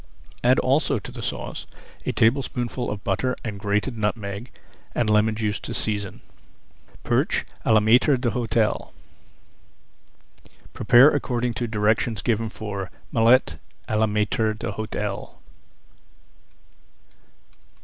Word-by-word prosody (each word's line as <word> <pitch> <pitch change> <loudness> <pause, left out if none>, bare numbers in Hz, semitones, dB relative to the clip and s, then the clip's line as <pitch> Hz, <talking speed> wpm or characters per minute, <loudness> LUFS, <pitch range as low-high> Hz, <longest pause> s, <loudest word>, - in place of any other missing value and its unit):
Add 125 +2 +5
also 135 +1 +2
to 105 - -8
the - - -8
sauce - - -5 0.4
a - - +2
tablespoonful 125 0 0
of 105 0 -5
butter 115 +6 0
and 105 -3 -5
grated 105 +5 -1
nutmeg 105 +1 -3 0.5
and 120 - +1
lemon 105 +1 +3
juice 105 -2 -1
to - - -6
season. 100 -3 -2 0.8
PERCH - - +1 0.2
À 110 - +5
LA 110 - +6
MAÎTRE 125 +6 +4
D'HÔTEL 115 -2 -1 1.8
Prepare 125 +6 +6
according 125 -4 -1
to 120 0 -3
directions 110 +1 0
given 115 -2 0
for 100 -4 -5 0.2
Mullet 115 - +3 0.3
à 110 - 0
la 110 - +3
Maître 105 +1 0
d'Hôtel. 105 -2 -4
110 Hz, 110 wpm, -24 LUFS, 105-120 Hz, 1.8 s, LA